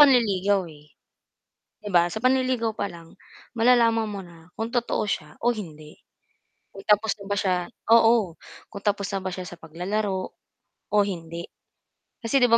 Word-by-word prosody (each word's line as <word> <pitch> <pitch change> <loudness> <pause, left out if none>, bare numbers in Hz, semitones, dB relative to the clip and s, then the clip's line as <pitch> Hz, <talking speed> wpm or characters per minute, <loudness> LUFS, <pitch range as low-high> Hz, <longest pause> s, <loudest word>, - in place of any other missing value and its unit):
panliligaw, 205 -8 +5
eh. 150 0 -17 0.9
'Di 210 - -10
ba 175 -2 +3
sa 220 - -4
panliligaw 255 -2 +1
pa 200 - -3
lang, 165 -1 -13 0.4
malalaman 230 -1 +4
mo 200 - -5
na 170 -2 -14
kung 225 - -1
totoo 235 -2 -1
siya 155 -6 -4
o 240 0 +2
hindi, 155 -7 -9 0.8
kung 195 - -12
tapos 210 0 +3
na 200 - -10
ba 200 - -1
siya 190 -2 +2 0.4
oo, 225 -7 +5 0.3
kung 200 - -7
tapos 200 -1 0
na 195 - -1
ba 185 -1 -4
siya 185 - -5
sa 175 -1 -9
paglalaro, 185 +4 -3 0.6
o 210 - +1
hindi, 170 -3 -5 0.8
kasi 270 +4 +3
'di 245 - +5
ba 230 - +7
200 Hz, 160 wpm, -25 LUFS, 175-230 Hz, 0.9 s, ba